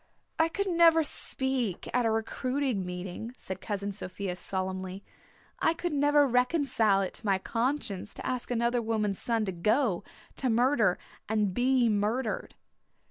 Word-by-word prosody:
"I 320 0 +4
could 400 +4 -2
never 335 -3 +5
speak 265 - -2
at 245 -2 +2
a - - +3
recruiting 250 +1 -1
meeting," 180 +6 -6
said 190 0 -6
Cousin 200 -1 -3
Sophia 190 -1 -4
solemnly. 190 +1 -4 0.6
"I 325 - +2
could 345 -1 -3
never 290 0 +4
reconcile 250 -5 +2
it 185 - -4
to - - -7
my 195 -1 +3
conscience 230 -1 -2
to - - -8
ask 255 -1 -1
another 235 0 +1
woman's 215 -3 -1
son 230 -2 0
to 190 - -2
go, 210 +3 +1 0.3
to 260 - 0
murder 235 -4 +3 0.3
and 210 -3 +1
be 250 +2 +3
murdered." 215 +3 -1
230 Hz, 145 wpm, -29 LUFS, 195-265 Hz, 0.6 s, never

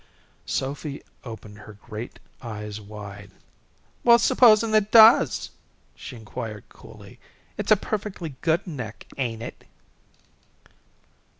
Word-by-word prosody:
Sophy 140 +2 -4 0.2
opened 110 -3 -10
her 105 +1 -12
great 110 +3 -9 0.2
eyes 105 -3 -7
wide. 100 -1 -10 0.7
"Well, 235 -1 +7
supposin' 225 -2 +5
it 215 -1 +3
does?" 225 +1 +6 0.4
she 130 - -10
inquired, 110 -2 -7
coolly. - - -15 0.4
"It's - - -3
a 215 - +8
perfectly 190 -7 -4
good 165 +2 +1
neck, 125 - -7
ain't 115 -3 -2
it?" - - -9
125 Hz, 105 wpm, -24 LUFS, -, 0.7 s, a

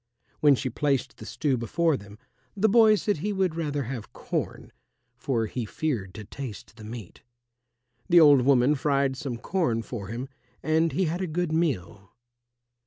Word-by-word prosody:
When 145 -2 +6
she 130 0 -3
placed 140 +1 -1
the - - -10
stew 140 -4 0
before 160 +8 +1
them, 100 -2 -10 0.4
the 210 +3 +3
boy 220 0 +6
said 205 -1 -1
he 205 +8 -2
would 190 -4 0
rather 145 -4 -2
have 120 -4 -6
corn, - - -4 0.4
for 120 -2 -1
he 120 +3 -4
feared 110 -6 -3
to 110 - -7
taste 120 -2 -8
the 110 - -11
meat. 110 -4 -9 0.9
The 175 -1 +7
old 145 -4 +7
woman 130 +1 +4
fried 140 -2 +1
some 130 -4 -5
corn 120 -7 -1
for 110 -5 -6
him, 120 +5 -5 0.4
and 160 +1 +2
he 190 - 0
had 170 +3 -2
a 185 - -1
good 175 +1 -2
meal. 115 - -2
140 Hz, 170 wpm, -26 LUFS, 115-165 Hz, 0.9 s, The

